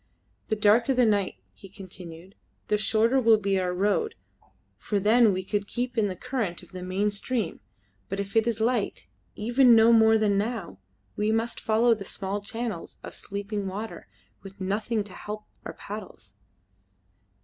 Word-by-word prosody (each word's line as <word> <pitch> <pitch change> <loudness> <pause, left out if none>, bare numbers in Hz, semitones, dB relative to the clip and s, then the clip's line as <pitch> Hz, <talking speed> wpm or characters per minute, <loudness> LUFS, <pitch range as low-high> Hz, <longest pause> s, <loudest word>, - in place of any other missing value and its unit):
"The 215 - 0
darker 225 +5 +4
the 250 -1 +4
night," 205 -3 +1 0.2
he 195 - -14
continued, 185 -2 -11 0.4
"the 210 - +3
shorter 225 +4 +3
will 225 -2 +6
be 200 -2 0
our 180 -1 0
road, 205 - 0 0.6
for 205 - -1
then 220 +2 +5
we 185 0 -2
could 205 +1 -2
keep 245 +2 -3
in 220 -3 +2
the 185 - -4
current 235 -7 -3
of - - -17
the 185 -1 -7
main 190 +3 0
stream, 205 -2 -2 0.5
but 195 - -3
if 200 +2 -5
it 225 0 +3
is 230 -2 0
light 230 -1 0 0.3
even 240 +3 +5
no 225 +1 +6
more 220 0 +6
than 205 -2 +2
now 210 - -4 0.4
we 210 +1 +1
must 225 +1 -1
follow 225 +2 +3
the 210 -3 -5
small 195 +1 -4
channels 220 -3 -5
of - - -8
sleeping 200 0 -4
water, 205 +4 -6 0.3
with 195 0 -12
nothing 210 +3 -1
to 200 -2 -13
help 210 +2 -7 0.2
our - - -5
paddles." 200 - -9
210 Hz, 170 wpm, -27 LUFS, 195-225 Hz, 0.6 s, will